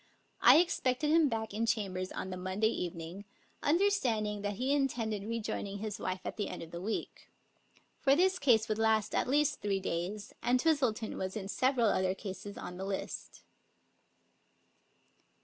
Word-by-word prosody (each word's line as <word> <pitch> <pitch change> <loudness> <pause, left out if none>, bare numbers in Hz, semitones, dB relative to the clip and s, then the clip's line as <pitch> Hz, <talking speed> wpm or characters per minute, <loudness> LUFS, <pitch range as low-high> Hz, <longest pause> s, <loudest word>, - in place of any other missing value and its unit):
I - - +9
expected 300 -4 +2
him 320 -2 +5
back 220 -3 -3
in 225 +2 -1
chambers 185 -4 -1
on 190 - -5
the - - -3
Monday 185 +4 0
evening, 175 0 -5 0.4
understanding 260 - +1
that 205 0 -2
he 260 +6 0
intended 235 -7 0
rejoining 210 -3 -3
his 210 0 -4
wife 185 0 -3
at - - -4
the 205 - -2
end - - -6
of 165 - -11
the 170 - -6
week; 215 +4 -4 0.7
for 275 -1 +4
this 370 +3 +3
case 235 -5 +4
would 215 -1 -1
last 220 -1 +2
at - - +1
least 295 +3 +2
three 200 -2 0
days, 190 +4 -3
and 250 +1 +2
Twistleton 255 -8 +1
was 190 +3 -3
in 195 -2 -5
several 255 +2 +2
other 185 -1 +1
cases 200 +1 -7
on 180 - -7
the 190 - -4
list. 195 -1 -5
215 Hz, 165 wpm, -32 LUFS, 195-255 Hz, 0.7 s, I